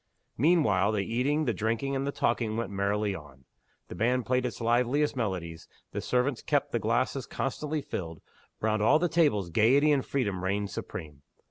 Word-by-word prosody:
Meanwhile 110 - +3
the 100 -2 0
eating, 140 +7 0
the 120 - +1
drinking, 115 +7 -1
and 135 +1 -1
the - - 0
talking 115 -4 0
went 115 -3 -3
merrily 100 +1 0
on. 70 -6 -11 0.4
The - - -8
band 125 +2 +1
played 125 0 +1
its 120 - -7
liveliest 125 +6 +1
melodies; 90 -8 -3 0.2
the - - -3
servants 125 0 0
kept 145 -1 0
the 120 - 0
glasses 120 +4 0
constantly 150 +2 -3
filled: 80 -3 -5 0.4
round 110 -1 0
all 110 - +5
the 175 +2 +1
tables 145 - +2
gayety 135 - +4
and 140 -3 +2
freedom 100 -9 -2
reigned 100 +1 -1
supreme. 75 -3 -7
115 Hz, 170 wpm, -29 LUFS, 100-135 Hz, 0.4 s, all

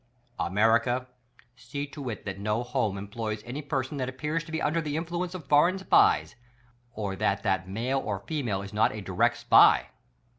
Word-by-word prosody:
America, 115 +6 +2 0.5
see 135 +4 -5
to 140 -2 -7
it 110 - -6
that 95 -1 -5
no 105 +3 -1
home 110 -5 -1
cm_ploys 105 +2 -5
any 130 +5 -5
person 140 -1 -3
that 130 -1 -2
appears 150 +6 -3
to 160 - -12
be 160 - -1
under 165 +3 0
the 150 -1 -3
influence 175 +2 -3
of 170 -6 -7
foreign 150 +7 +4
SPIES, 190 - +3 0.6
or 100 -3 -3
that 100 +1 0
that 95 -3 0
male 120 +7 -1
or 100 -6 -4
female 120 -11 -2
is 100 - -9
not 105 +1 +3
a 105 - -5
direct 95 -2 +1
SPY! - - +5
125 Hz, 180 wpm, -27 LUFS, 105-145 Hz, 0.6 s, SPY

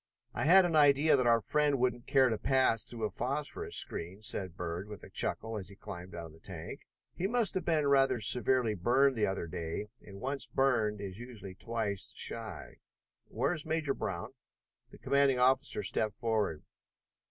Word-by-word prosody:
"I - - -1
had 185 +3 +7
an 170 -2 0
idea 145 +1 +5
that 130 -3 +2
our 115 -1 +4
friend 150 +1 +1
wouldn't 125 -1 -1
care 135 -2 +4
to 110 - 0
pass 130 -5 +2
through 115 -2 -4
a - - -3
phosphorus 140 +4 -3
screen," 95 +6 -2
said 105 -4 -1
Dr. - - -28
Bird 90 +2 -4
with 105 -2 -10
a - - -12
chuckle 110 -1 -2
as 95 -2 -7
he 100 - -11
climbed 90 -2 -9
out 85 -1 -6
of 80 - -11
the 80 - -17
tank. 85 -2 -7 0.3
"He 185 - -2
must 230 -3 +2
have 185 -3 -2
been 155 -3 +2
rather 135 -3 +3
severely 125 +1 +2
burned 130 +8 +3
the 110 -2 +1
other 95 -3 -2
day, 85 +5 -5
and 100 -1 -12
once 135 +3 -3
burned 110 -6 +1
is 95 0 -6
usually 110 -6 -8
twice 110 -1 -3
shy. - - -3 0.5
Where 135 +8 0
is 155 -4 -4
Major 155 -3 -1
Brown?" - - -5 0.6
The - - -14
commanding 140 -2 +2
officer 125 -4 +2
stepped 110 -2 0
forward. 110 -9 -1
120 Hz, 185 wpm, -32 LUFS, 100-140 Hz, 0.6 s, had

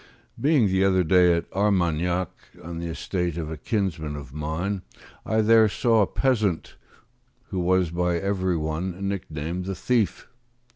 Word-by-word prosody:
Being 145 -4 +3
the 95 -1 +2
other 95 -1 +3
day 90 +1 +5
at 85 - -4
Armaignac, 90 -3 +1 0.3
on 85 0 -6
the 85 - -4
estate 85 +1 -3
of 80 -2 -4
a - - -3
kinsman 80 -5 -2
of 70 -3 -9
mine, 80 +6 -3 0.5
I 110 0 +2
there 110 0 +5
saw 115 +2 +2
a 100 - +3
peasant 110 -10 0 0.7
who 95 - -3
was 90 -1 +2
by 90 0 0
every 95 -1 0
one 85 +5 -3
nicknamed 85 -2 -4
the 95 0 -3
thief. 110 +3 0
90 Hz, 150 wpm, -25 LUFS, 85-100 Hz, 0.7 s, day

